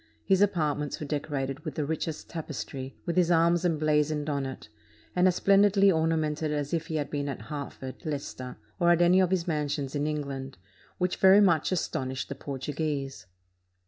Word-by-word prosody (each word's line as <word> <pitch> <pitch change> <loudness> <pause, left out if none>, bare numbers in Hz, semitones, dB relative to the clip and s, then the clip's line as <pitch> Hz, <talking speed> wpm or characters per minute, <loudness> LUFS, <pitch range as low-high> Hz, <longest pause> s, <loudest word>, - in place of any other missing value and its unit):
His 195 -1 +3
apartments 150 -7 0
were 150 - -4
decorated 140 -2 -3
with 155 - -7
the 150 - -1
richest 160 +1 -3
tapestry, 135 -4 -6
with 170 - -2
his 175 -2 +4
arms 170 0 +3
emblazoned 155 -2 +1
on 140 -2 -1
it, 130 - -8 0.5
and 180 +1 +4
as 180 - +2
splendidly 200 0 +5
ornamented 160 -2 0
as 145 0 -2
if 165 -1 -1
he 160 - -4
had 145 -2 -2
been 145 -1 -2
at 135 - -4
Hert 140 +4 -6
ford, 130 +4 -9
Leicester, 140 -5 -5 0.2
or 175 -1 +4
at 175 0 +5
any 180 +2 +5
of 185 -2 +3
his 185 -2 0
mansions 145 -3 -2
in 145 0 -1
England, 140 -4 -4 0.4
which 180 0 0
very 190 +1 +7
much 170 -6 +3
astonished 130 -7 -2
the - - -3
Portuguese. 140 - -4
150 Hz, 175 wpm, -28 LUFS, 140-170 Hz, 0.5 s, very